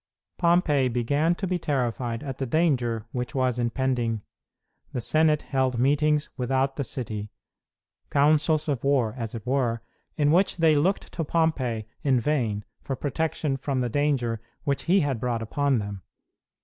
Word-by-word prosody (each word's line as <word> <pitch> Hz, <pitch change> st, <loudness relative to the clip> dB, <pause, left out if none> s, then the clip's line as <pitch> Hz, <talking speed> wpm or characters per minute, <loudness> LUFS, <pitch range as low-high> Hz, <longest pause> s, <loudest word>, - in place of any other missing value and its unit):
Pompey 170 Hz, -6 st, +3 dB
began 140 Hz, +8 st, +1 dB
to 195 Hz, -, -3 dB
be 180 Hz, -1 st, -1 dB
terrified 125 Hz, -4 st, -1 dB
at 135 Hz, -3 st, -6 dB
the 135 Hz, -, -2 dB
danger 120 Hz, -7 st, +1 dB
which 125 Hz, +3 st, -4 dB
was 130 Hz, -2 st, +1 dB
impending. 120 Hz, -3 st, 0 dB, 0.7 s
The 125 Hz, -, -1 dB
Senate 155 Hz, +4 st, +2 dB
held 130 Hz, -2 st, 0 dB
meetings 150 Hz, +4 st, +2 dB
without 135 Hz, +2 st, 0 dB
the 140 Hz, -, -2 dB
city 110 Hz, -5 st, -5 dB, 0.8 s
councils 150 Hz, +2 st, +3 dB
of 140 Hz, -6 st, -1 dB
war, 135 Hz, -6 st, +2 dB
as 115 Hz, -3 st, -5 dB
it 110 Hz, -, -7 dB
were, 125 Hz, -3 st, 0 dB, 0.3 s
in 145 Hz, -1 st, +3 dB
which 185 Hz, +3 st, +3 dB
they 160 Hz, -2 st, +4 dB
looked 175 Hz, +7 st, 0 dB
to 165 Hz, -, -2 dB
Pompey 140 Hz, -9 st, 0 dB, 0.2 s
in 135 Hz, -4 st, +3 dB
vain 115 Hz, -7 st, 0 dB, 0.2 s
for 135 Hz, -, -3 dB
protection 145 Hz, 0 st, -1 dB
from 135 Hz, -1 st, -1 dB
the 125 Hz, -, 0 dB
danger 125 Hz, -5 st, 0 dB, 0.2 s
which 140 Hz, -1 st, -1 dB
he 185 Hz, +3 st, +4 dB
had 140 Hz, -6 st, -1 dB
brought 115 Hz, -1 st, -1 dB
upon 140 Hz, +3 st, +1 dB
them. 100 Hz, -3 st, -4 dB
135 Hz, 155 wpm, -26 LUFS, 120-150 Hz, 0.8 s, they